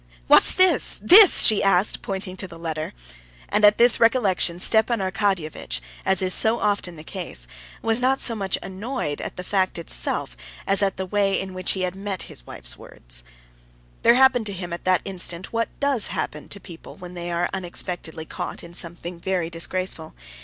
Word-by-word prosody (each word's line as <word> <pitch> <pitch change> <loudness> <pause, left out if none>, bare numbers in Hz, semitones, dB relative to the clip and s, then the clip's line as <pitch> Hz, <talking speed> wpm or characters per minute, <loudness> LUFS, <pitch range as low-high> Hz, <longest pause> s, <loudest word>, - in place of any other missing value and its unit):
"What's - - +6
this? 370 0 +3
this?" 390 +1 +8
she 215 - +6
asked, 195 0 +2
pointing 190 -1 -5
to 190 - -2
the 170 -2 -12
letter. 160 -2 -5 0.6
And 210 - +1
at 210 0 +6
this 240 0 +5
recollection, 210 -7 +2
Stepan 220 +4 +2
Arkadyevitch, 190 - -2 0.3
as 190 -1 +3
is 185 0 +2
so 225 +1 +2
often 200 -4 -1
the 155 - -11
case, 165 - -4 0.4
was 225 +1 +1
not 260 +2 +2
so 235 - -1
much 195 -4 -2
annoyed 195 - -4
at - - -6
the 180 - -6
fact 190 -1 0
itself 165 - -3 0.3
as 195 +1 +2
at 195 -1 0
the 190 - -3
way 195 0 +1
in 190 -1 -6
which 185 0 0
he 190 - -4
had 180 0 -2
met 195 -1 -4
his - - -9
wife's - - -2
words. - - -4 0.8
There 235 - +5
happened 255 -3 +4
to 200 - -4
him 175 -2 -6
at 170 - -7
that 185 -1 +2
instant 185 -1 -1
what 230 0 -1
does 280 -6 +2
happen 150 - -5
to 200 - -5
people 170 -4 -12
when 180 -2 -10
they 175 -1 -6
are 170 +1 0
unexpectedly 175 -3 -5
caught - - -6
in 170 - -12
something 175 0 -4
very 175 -2 -2
disgraceful. 170 -1 -3
190 Hz, 185 wpm, -23 LUFS, 175-210 Hz, 0.8 s, this